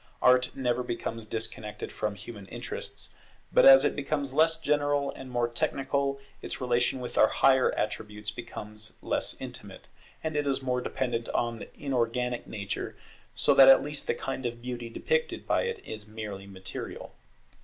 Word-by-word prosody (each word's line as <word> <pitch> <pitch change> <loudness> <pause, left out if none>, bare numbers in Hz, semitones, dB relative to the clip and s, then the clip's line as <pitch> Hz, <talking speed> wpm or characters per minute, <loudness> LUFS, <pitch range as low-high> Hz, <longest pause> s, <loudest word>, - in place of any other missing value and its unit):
Art 125 0 +4
never 125 -2 0
becomes 115 -2 -4
disconnected 110 -1 -4
from 105 -1 -2
human 100 -1 -9
interests; - - -5 0.4
but - - +7
as 135 +1 +10
it - - +1
becomes 145 -1 -2
less 160 +2 +4
general 145 -2 +1
and 130 - -10
more 120 -1 +1
technical, 140 +3 -1 0.2
its - - -3
relation 125 0 +1
with 125 - -3
our 110 - +8
higher 130 +2 +4
attributes 105 0 -3
becomes 110 -2 -7
less - - -1
intimate, - - -9 0.3
and 160 -1 -2
it 145 -1 0
is 135 -1 +1
more 125 -1 0
dependent 120 -2 -2
on 120 -1 -1
inorganic 125 -2 -1
Nature, 100 -2 -4 0.4
so - - +4
that 135 -1 +9
at 135 - +8
last 150 0 -4
the - - +1
kind 135 0 -4
of 120 0 -6
beauty 120 -1 -5
depicted 475 - -1
by - - +2
it 470 -2 -3
is 110 -1 -5
merely 105 -3 -7
material. 95 -1 -6
125 Hz, 160 wpm, -29 LUFS, 110-140 Hz, 0.4 s, as